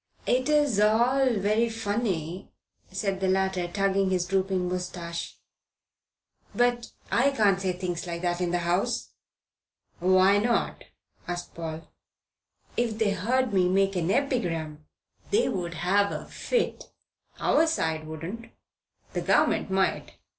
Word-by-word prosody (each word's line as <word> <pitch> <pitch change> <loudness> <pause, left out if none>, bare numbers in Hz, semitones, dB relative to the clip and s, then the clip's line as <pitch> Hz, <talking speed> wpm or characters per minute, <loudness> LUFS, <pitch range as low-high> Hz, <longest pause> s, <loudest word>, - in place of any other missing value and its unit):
"It's 275 -2 +2
all 240 +4 +3
very 215 +4 +1
funny," 205 -6 -3 0.4
said 195 -2 -2
the 190 - 0
latter, 190 -1 +1
tugging 195 +1 +1
his 180 -2 +1
drooping 190 -1 0
moustache, 180 -2 -5 1.2
"but 245 -1 +1 0.2
I 260 +4 +4
can't 205 -8 +2
say 185 -1 0
things 180 -1 -4
like 170 0 -5
that 175 0 0
in 175 - 0
the 175 - +1
House." 200 +8 0 0.9
"Why 185 +3 +5
not?" 235 +2 0 0.4
asked 175 0 -5
Paul. 165 -1 -6 0.9
"If 230 -2 0
they 220 -2 +2
heard 235 +5 0
me 180 -2 +3
make 195 +1 +2
an 175 -1 0
epigram, 165 - -1 0.4
they 435 +4 +3
would 175 -3 -3
have 195 +5 +2
a - - -5
fit." 485 -2 -2 0.5
"Our 320 +3 +3
side 160 - -1
wouldn't. 165 +9 -7 0.6
The - - -1
Government - - +2
might. 190 0 0
195 Hz, 125 wpm, -27 LUFS, 175-230 Hz, 1.2 s, Why